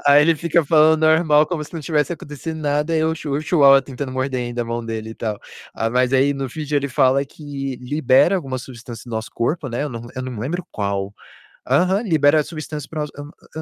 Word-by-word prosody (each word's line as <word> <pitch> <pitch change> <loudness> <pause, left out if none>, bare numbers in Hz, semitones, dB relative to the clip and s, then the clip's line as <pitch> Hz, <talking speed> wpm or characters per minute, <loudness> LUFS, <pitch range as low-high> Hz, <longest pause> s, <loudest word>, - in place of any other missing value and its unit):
Aí 145 +1 +7
ele 165 +2 +4
fica 170 0 +1
falando 155 +1 +4
normal 155 -1 +4
como 165 -2 -3
se - - -15
não 165 - -4
tivesse 150 0 0
acontecendo 155 +2 -7
nada, 150 +2 0
e 160 - +2
o 160 0 +1
chu 150 -3 -5
o 145 - 0
chihuahua 140 -4 +5
tentando 135 0 -6
morder 130 0 -2
ainda 120 0 -3
a - - -6
mão 115 0 -3
dele 110 -1 -5
e 110 - -8
tal. 110 -2 -3 0.4
Ah, 115 - -1
mas 125 +1 +1
aí, 135 +2 +4
no 135 -1 -3
vídeo, 150 +2 -3
ele 140 0 0
fala 130 +1 +3
que 140 -2 -6
libera 140 +6 +3
alguma 135 -7 -4
substância 120 -2 -10
no 120 - -6
nosso 110 +1 -5
corpo, 135 +5 -1
né, 120 +3 -2
eu 150 - -2
não 120 -1 -7
eu 130 - -3
não 130 0 -5
me 110 - -6
lembro 165 +9 -3
qual. 100 -1 -2 0.6
Aham, 190 +3 +3
libera 155 - +3
substâncias 155 -2 -7
para 155 -2 -3
o - - -2
no 145 0 -10
hum, - - -11 0.3
hã 160 - -4
145 Hz, 240 wpm, -21 LUFS, 125-155 Hz, 0.6 s, Aí